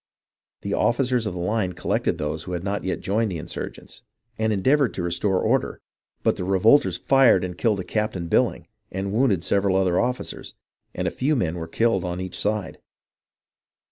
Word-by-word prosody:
The - - -3
officers 125 -2 +1
of 90 - -4
the - - -5
line 95 0 -1
collected - - -1
those 75 +1 -3
who 90 - -5
had 85 0 -3
ncit 100 0 -2
yet 95 - -2
joined 105 +2 0
the 85 - -3
insurgents, 85 +2 -7 0.3
and 110 0 0
endeavoured 130 +7 +2
to 90 - -3
restore 90 +2 0
order, - - 0 0.4
but - - +2
the - - -3
revolters 95 +1 +4
fired 130 -5 +4
and 90 -1 -4
killed 105 0 +1
a - - -6
Captain 95 -3 -2
BilHng, - - +1 0.3
and 95 +1 -3
wounded 110 -7 +2
several 100 0 +1
other 95 -2 +2
officers, 125 +1 -3 0.4
and - - -1
a - - -1
few 145 +4 0
men 90 - 0
were 80 -2 -5
killed 115 +1 +1
on 90 0 -3
each 95 -1 -5
side. 105 -1 -2
95 Hz, 180 wpm, -24 LUFS, 90-115 Hz, 0.4 s, revolters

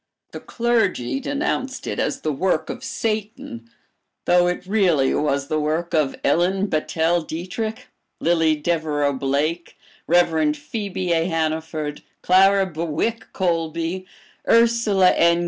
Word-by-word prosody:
The - - -7
clergy 230 - 0
denounced 270 -1 -3
it - - -3
as - - -1
the 155 - -1
work 175 +2 0
of 255 - -9
Satan, 235 +1 -4 0.6
though 175 0 +4
it 180 +1 -2
really 180 -9 +2
was 140 -2 0
the 155 +1 0
work 155 +3 -2
of 150 -4 +1
Ellen 180 +6 +2
Battelle 160 +2 0
Dietrick, 215 +9 -5 0.3
Lillie 165 -2 +2
Devereux 150 -2 0
Blake, 145 +6 -2 0.3
Rev. 160 -3 +3
Phebe 185 +2 -3
A. 165 0 +1
Hanaford, 160 -2 -2 0.2
Clara 195 +2 +5
Bewick 170 +7 -3
Colby, 170 0 -2 0.4
Ursula 230 -5 +4
N. 170 0 +3
175 Hz, 120 wpm, -22 LUFS, 155-200 Hz, 0.6 s, Clara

